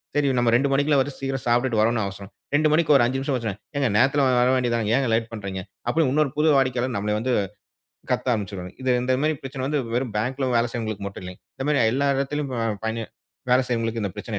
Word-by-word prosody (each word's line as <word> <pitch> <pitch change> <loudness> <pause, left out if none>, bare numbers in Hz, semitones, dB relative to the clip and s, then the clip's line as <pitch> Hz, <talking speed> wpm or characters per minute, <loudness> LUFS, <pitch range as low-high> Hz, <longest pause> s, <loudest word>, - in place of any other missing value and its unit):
சரி 145 -1 +2
நம்ம 120 -1 +3
2 135 +4 +2
மணிக்குள்ள 145 +1 +3
வந்து 140 +1 -1
சீக்கிரம் 135 -1 -3
சாப்பிட்டுட்டு 120 -1 +2
வரணும்னு 115 +1 +2
அவசியம். 100 0 -7 0.3
2 155 +1 +3
மணிக்கு 155 -1 +4
ஒரு 130 - +6
5 130 +2 -1
நிமிஷம் 135 +1 -1
ஆச்சுன்னா, 115 -5 -3 0.2
ஏங்க 140 -3 +1
நேரத்துல 135 +4 +3 0.2
வர 125 +1 +4
வேண்டியதுதானே, 120 -4 0
ஏன்ங்க 135 -3 +1
லேட் 115 0 0
பண்றீங்க? 100 -4 -5 0.3
அப்படின்னு 145 +1 +2
இன்னொரு 150 -1 +2
புது 155 +1 +3
வாடிக்கையாளர் 130 -2 +1
நம்மளை 105 +1 -1
வந்து 125 +3 -1 0.8
கத்த 130 - 0
ஆரம்பிச்சிடுவாங்க 95 -3 -5
இது 130 - 0
இந்த 130 +1 +1
மாதிரிப்பிரச்சனை 140 -3 -2
வந்து 145 +1 0
வெறும் 120 -3 -1
பேங்க்ல 130 +4 -1
வேலை 115 +1 +2
செய்றவங்களுக்கு 110 -4 -4
மட்டுமில்லைங்க. 90 -2 -8
இந்த 135 - -4
மாதிரி 150 - +3
எல்லா 140 +2 +1
இடத்துலயும் 140 0 -2 0.3
பயன் 110 +1 -2 0.5
வேலை 130 +1 +5
செய்றவங்களுக்கு 115 -2 -1
இந்தப் 100 0 -4
பிரச்சனை 105 0 -4
125 Hz, 200 wpm, -24 LUFS, 110-135 Hz, 0.8 s, ஒரு